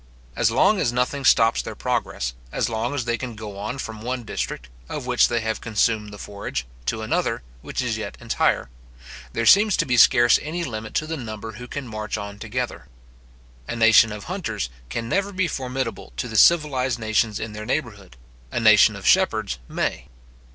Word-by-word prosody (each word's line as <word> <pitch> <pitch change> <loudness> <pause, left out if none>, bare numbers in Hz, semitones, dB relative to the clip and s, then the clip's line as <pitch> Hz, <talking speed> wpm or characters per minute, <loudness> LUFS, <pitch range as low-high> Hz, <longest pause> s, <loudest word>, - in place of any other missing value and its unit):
As - - +3
long 185 - +3
as 120 - +1
nothing 125 +3 -1
stops 115 -3 +4
their - - -7
progress, - - -2 0.2
as - - -1
long 115 +4 -2
as 130 -5 -2
they 120 -1 -1
can 125 -3 -5
go 105 -2 -8
on 110 +6 -4
from 110 -4 -6
one 125 +1 -3
district, 65 - -4 0.2
of 140 - -5
which 125 -1 +4
they 120 -1 0
have 110 0 -2
consumed 110 -1 0
the 105 - -9
forage, 100 -12 -5 0.2
to 110 -1 -1
another, 110 - -1 0.2
which - - -3
is - - -2
yet - - -6
entire; - - 0 0.6
there - - -1
seems 205 0 +6
to 165 - +2
be 125 -3 +1
scarce 120 0 +6
any 170 +3 -3
limit 110 -6 -6
to 155 - +1
the 160 +1 -4
number 110 -3 -6
who 125 +3 -9
can 140 +1 -6
march 110 -1 -4
on 100 0 -7
together. 120 - -4 0.8
A - - -3
nation 115 -1 +6
of 105 0 -7
hunters 170 - -4 0.2
can 115 - -3
never 200 +9 0
be 185 -2 0
formidable 130 -3 -4
to - - -2
the 110 - -8
civilized 135 -4 +4
nations 110 -1 0
in 110 - -5
their 105 0 -7
neighbourhood; 105 - -3 0.3
a - - -1
nation - - +6
of - - -9
shepherds 65 - +2
may. 60 +2 -2
115 Hz, 190 wpm, -23 LUFS, 110-130 Hz, 0.8 s, seems